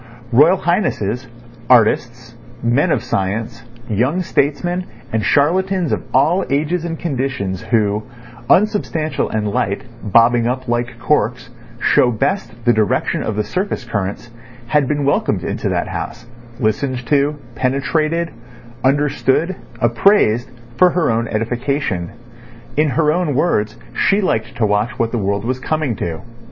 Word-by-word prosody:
Royal 150 Hz, +10 st, +6 dB
Highnesses, 130 Hz, -, -1 dB, 0.4 s
artists, 120 Hz, 0 st, +3 dB, 0.3 s
men 125 Hz, +9 st, +2 dB
of -, -, +1 dB
science, 110 Hz, +5 st, -2 dB, 0.3 s
young 130 Hz, -, +1 dB
statesmen, 175 Hz, +5 st, 0 dB, 0.3 s
and 110 Hz, -1 st, +1 dB
charlatans 180 Hz, -, +2 dB
of -, -, 0 dB
all 160 Hz, +8 st, +3 dB
ages 155 Hz, +5 st, 0 dB
and 165 Hz, -1 st, -3 dB
conditions, 130 Hz, -, -2 dB
who, 105 Hz, -2 st, +1 dB, 0.5 s
unsubstantial 180 Hz, -6 st, +1 dB
and 105 Hz, -1 st, -1 dB
light, 100 Hz, -4 st, -1 dB, 0.2 s
bobbing 115 Hz, +2 st, +4 dB
up 130 Hz, +1 st, -2 dB
like 120 Hz, 0 st, -1 dB
corks, 120 Hz, -3 st, 0 dB, 0.3 s
show 125 Hz, -, +4 dB
best 125 Hz, -, -1 dB
the 120 Hz, -, +5 dB
direction 110 Hz, -3 st, +1 dB
of 110 Hz, -, -2 dB
the 105 Hz, -, 0 dB
surface 155 Hz, -, -3 dB
currents, 105 Hz, +1 st, -4 dB, 0.4 s
had 140 Hz, +1 st, +2 dB
been 145 Hz, -1 st, 0 dB
welcomed 140 Hz, -, +1 dB
in -, -, -2 dB
that -, -, -1 dB
house, 120 Hz, 0 st, -6 dB, 0.3 s
listened 125 Hz, +3 st, -1 dB
to, 145 Hz, +4 st, +2 dB, 0.2 s
penetrated, 155 Hz, +7 st, 0 dB, 0.5 s
understood, 145 Hz, +5 st, +1 dB, 0.3 s
appraised, 120 Hz, -, +3 dB, 0.3 s
for 180 Hz, -, +6 dB
her 175 Hz, -7 st, +1 dB
own 115 Hz, +1 st, 0 dB
edification. 115 Hz, -, -2 dB, 0.7 s
In 150 Hz, 0 st, +3 dB
her 150 Hz, +2 st, +2 dB
own 170 Hz, -5 st, 0 dB
words, 110 Hz, -8 st, +1 dB, 0.2 s
she 195 Hz, -, +2 dB
liked 115 Hz, -, -1 dB
to 115 Hz, -, +1 dB
watch 105 Hz, +3 st, 0 dB
what 115 Hz, -1 st, 0 dB
the 120 Hz, -, -1 dB
world 100 Hz, +1 st, -1 dB
was 130 Hz, +1 st, -1 dB
coming 155 Hz, -3 st, -1 dB
to. 80 Hz, -2 st, -4 dB
125 Hz, 135 wpm, -18 LUFS, 115-155 Hz, 0.7 s, Royal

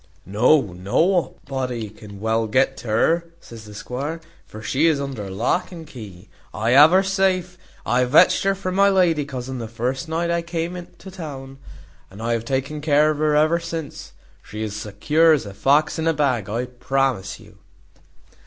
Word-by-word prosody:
"No, 120 Hz, +10 st, +4 dB
nobody 125 Hz, -, -1 dB
can 105 Hz, -2 st, -12 dB
well 110 Hz, +1 st, 0 dB
get 135 Hz, +4 st, +2 dB
to 120 Hz, -, -10 dB
her," 165 Hz, +10 st, +2 dB
says 115 Hz, -7 st, -12 dB
the 105 Hz, 0 st, -12 dB
squire, 140 Hz, +9 st, -5 dB, 0.3 s
"for 110 Hz, +1 st, -10 dB
she 135 Hz, +9 st, +2 dB
is 155 Hz, -3 st, +2 dB
under 130 Hz, -8 st, -5 dB
lock 115 Hz, -, -1 dB
and 165 Hz, -3 st, -9 dB
key. 105 Hz, -, -11 dB, 0.3 s
I 110 Hz, +2 st, 0 dB
have 145 Hz, +4 st, +8 dB
her 190 Hz, +3 st, +4 dB
safe; 190 Hz, -2 st, 0 dB, 0.3 s
I 125 Hz, +2 st, +2 dB
vetched 130 Hz, +5 st, +5 dB
her 195 Hz, 0 st, +2 dB
from 185 Hz, -1 st, -4 dB
my 200 Hz, +1 st, +4 dB
lady 175 Hz, -6 st, +2 dB
cousin 130 Hz, -2 st, -6 dB
the 115 Hz, -, -5 dB
first 125 Hz, +7 st, -3 dB
night 170 Hz, +1 st, -1 dB
I 170 Hz, 0 st, 0 dB
came 170 Hz, +1 st, -4 dB
to 190 Hz, -, -11 dB
town, 135 Hz, -6 st, -8 dB, 0.5 s
and 95 Hz, -, -13 dB
I 115 Hz, +1 st, -1 dB
have 115 Hz, -1 st, -2 dB
taken 135 Hz, +4 st, -2 dB
care 150 Hz, 0 st, +3 dB
o' -, -, 0 dB
her 150 Hz, 0 st, +1 dB
ever 155 Hz, +3 st, +3 dB
since; 165 Hz, -3 st, -7 dB, 0.3 s
she 105 Hz, +1 st, -7 dB
is 105 Hz, -2 st, -4 dB
as 105 Hz, -, -5 dB
secure 150 Hz, +11 st, +3 dB
as 145 Hz, -, 0 dB
a 100 Hz, -, -8 dB
fox 140 Hz, +11 st, +2 dB
in 160 Hz, -, -1 dB
a 165 Hz, -, +3 dB
bag, 130 Hz, -9 st, 0 dB
I 115 Hz, +4 st, -2 dB
promise 125 Hz, -4 st, -2 dB
you." -, -, -18 dB
135 Hz, 185 wpm, -22 LUFS, 115-165 Hz, 0.5 s, have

